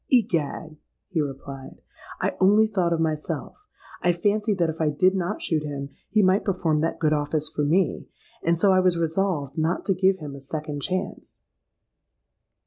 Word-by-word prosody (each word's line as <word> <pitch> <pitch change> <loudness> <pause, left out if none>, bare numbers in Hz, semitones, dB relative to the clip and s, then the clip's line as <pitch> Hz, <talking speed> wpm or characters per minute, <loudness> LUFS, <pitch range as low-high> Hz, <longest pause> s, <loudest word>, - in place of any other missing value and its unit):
—'Egad!' 165 - +1 0.3
he 170 -5 0
replied, 135 -1 -7 0.4
'I - - 0
only 205 +3 +6
thought 190 -5 0
of 165 - +1
myself. 155 -1 -2 0.5
I 175 - +3
fancied 205 +4 0
that 170 -3 +2
if 160 - -7
I 155 - +3
did 185 +6 +3
not 190 +2 -2
shoot 160 -2 0
him, 140 -2 -5 0.2
he 215 -1 +3
might 185 +2 +3
perform 170 -6 0
that 165 +2 -1
good 155 -1 +2
office 150 +1 0
for 150 - -2
me; 165 +3 +1 0.3
and 170 +1 +2
so 195 +3 +4
I 185 - +5
was 185 -2 +3
resolved 165 -4 -1
not 165 +3 0
to 195 - +2
give 190 +1 +2
him 150 -5 -7
a 140 - -10
second 150 +1 -5
chance.' 185 +4 -4
165 Hz, 175 wpm, -25 LUFS, 150-190 Hz, 0.5 s, only